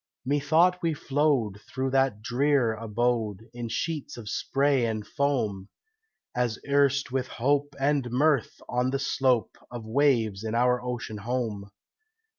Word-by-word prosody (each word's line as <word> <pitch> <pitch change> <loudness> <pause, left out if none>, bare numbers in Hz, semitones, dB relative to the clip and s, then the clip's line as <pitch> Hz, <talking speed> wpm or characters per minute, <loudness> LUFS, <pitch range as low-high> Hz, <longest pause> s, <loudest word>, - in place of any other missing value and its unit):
Methought 155 +6 +3
we 165 -2 0
flowed 135 -9 0
through 130 +2 -3
that 135 -6 +1
drear 125 0 +2
abode 110 -1 -1
In 120 -1 -5
sheets 155 +3 -3
of 110 -3 -7
spray 135 +3 +1
and 110 -2 -2
foam, 120 - -1 0.7
As 120 -2 0
erst 140 -1 +2
with 130 -1 -1
hope 145 +3 0
and 140 -2 +1
mirth 140 0 +1
on 125 +1 0
the 135 - 0
slope 130 -3 +1
Of 120 -2 -7
waves 115 -5 +2
in 110 0 -2
our 125 +1 +3
ocean 120 -3 -4
home. 110 -3 -3
125 Hz, 135 wpm, -27 LUFS, 115-140 Hz, 0.7 s, Methought